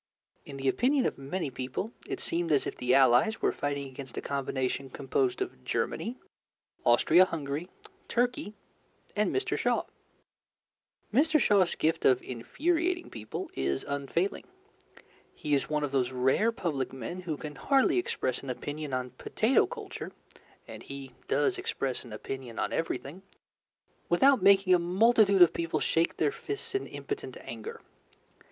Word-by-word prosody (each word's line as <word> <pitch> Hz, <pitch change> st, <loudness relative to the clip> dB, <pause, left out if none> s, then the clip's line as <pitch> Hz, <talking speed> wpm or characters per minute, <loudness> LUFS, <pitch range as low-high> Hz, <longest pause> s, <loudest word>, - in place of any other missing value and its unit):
In 140 Hz, -, -7 dB
the 135 Hz, 0 st, -3 dB
opinion 255 Hz, -, +3 dB
of -, -, -1 dB
many 140 Hz, +2 st, -3 dB
people, 130 Hz, -, -4 dB, 0.2 s
it -, -, -4 dB
seemed 170 Hz, -1 st, -1 dB
as 145 Hz, -, +3 dB
if -, -, -4 dB
the 125 Hz, +1 st, +2 dB
Allies 135 Hz, -, +5 dB
were -, -, +2 dB
fighting 140 Hz, -1 st, -3 dB
against 130 Hz, -1 st, -9 dB
a -, -, -1 dB
combination 135 Hz, -1 st, -2 dB
composed 370 Hz, -, 0 dB
of 370 Hz, -, -11 dB
Germany, 240 Hz, +3 st, -2 dB, 0.7 s
Austria 185 Hz, -, +6 dB
Hungary, 155 Hz, 0 st, -4 dB, 0.4 s
Turkey, 245 Hz, -1 st, 0 dB, 0.6 s
and 210 Hz, 0 st, +2 dB
Mr. 390 Hz, 0 st, 0 dB
Shaw. -, -, +1 dB, 1.3 s
Mr. 310 Hz, +5 st, +4 dB
Shaw's 200 Hz, -7 st, +3 dB
gift 160 Hz, +1 st, 0 dB
of 125 Hz, -1 st, +4 dB
infuriating 340 Hz, -, -1 dB
people 110 Hz, -2 st, -6 dB
is 70 Hz, 0 st, -1 dB
unfailing. 140 Hz, +7 st, -1 dB, 0.9 s
He 150 Hz, -, -2 dB
is 140 Hz, -, +1 dB
one 150 Hz, -1 st, 0 dB
of 145 Hz, -, -2 dB
those 130 Hz, -3 st, +1 dB
rare 130 Hz, -, +2 dB
public 155 Hz, -, -2 dB
men 135 Hz, +8 st, -6 dB
who 165 Hz, -4 st, -3 dB
can 150 Hz, 0 st, -7 dB
hardly 275 Hz, -, +3 dB
express 130 Hz, -, -2 dB
an 135 Hz, -, -8 dB
opinion 145 Hz, +3 st, -5 dB
on 125 Hz, 0 st, -2 dB
potato 220 Hz, -, +2 dB
culture 440 Hz, -6 st, -7 dB, 0.6 s
and -, -, -9 dB
he 140 Hz, -1 st, -8 dB, 0.2 s
does 145 Hz, +1 st, +1 dB
express 130 Hz, -2 st, -2 dB
an 120 Hz, -, -12 dB
opinion 120 Hz, +2 st, -6 dB
on -, -, -1 dB
everything 165 Hz, +1 st, -3 dB, 0.9 s
without 265 Hz, +8 st, +5 dB
making 195 Hz, -1 st, +6 dB
a 180 Hz, -, +5 dB
multitude 195 Hz, +2 st, +5 dB
of 170 Hz, -, +4 dB
people 165 Hz, -1 st, -1 dB
shake 165 Hz, +1 st, +1 dB
their 150 Hz, -2 st, +2 dB
fists 415 Hz, -1 st, -5 dB
in 395 Hz, -, -1 dB
impotent -, -, -6 dB
anger. 460 Hz, +1 st, -8 dB
155 Hz, 150 wpm, -29 LUFS, 135-220 Hz, 1.3 s, Austria